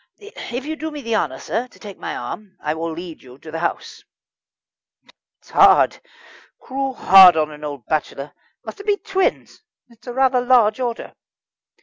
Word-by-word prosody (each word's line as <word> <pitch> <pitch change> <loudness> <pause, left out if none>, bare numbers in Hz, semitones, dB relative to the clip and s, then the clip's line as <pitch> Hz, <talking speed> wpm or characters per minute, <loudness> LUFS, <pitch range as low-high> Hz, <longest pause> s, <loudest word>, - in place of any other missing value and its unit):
"If 270 - -8
you'd 315 +1 -5
do 315 - -4
me 295 -2 -8
the 230 -1 -1
honour, 130 -10 -1
sir, 240 - -3
to - - -21
take 205 -3 -11
my - - -5
arm, 205 -3 -8
I 150 - -2
would 165 +1 -4
lead 170 -1 -9
you 125 0 -15
to 155 +2 -12
the 165 - -4
house." 170 - -4 1.3
"It's - - -22
hard - - +5 0.6
cruel 270 0 -4
hard 185 -5 +8
on 155 -1 0
an 150 0 -12
old 145 -6 -7
bachelor. 150 -2 -3 0.3
Must - - -9
it 405 - -11
be 410 -1 +2
twins? 385 -2 -2 0.3
It's 235 0 -22
a 245 - -5
rather 260 -1 +2
large 245 -3 +3
order." 240 -2 -4
215 Hz, 180 wpm, -20 LUFS, 160-260 Hz, 1.3 s, hard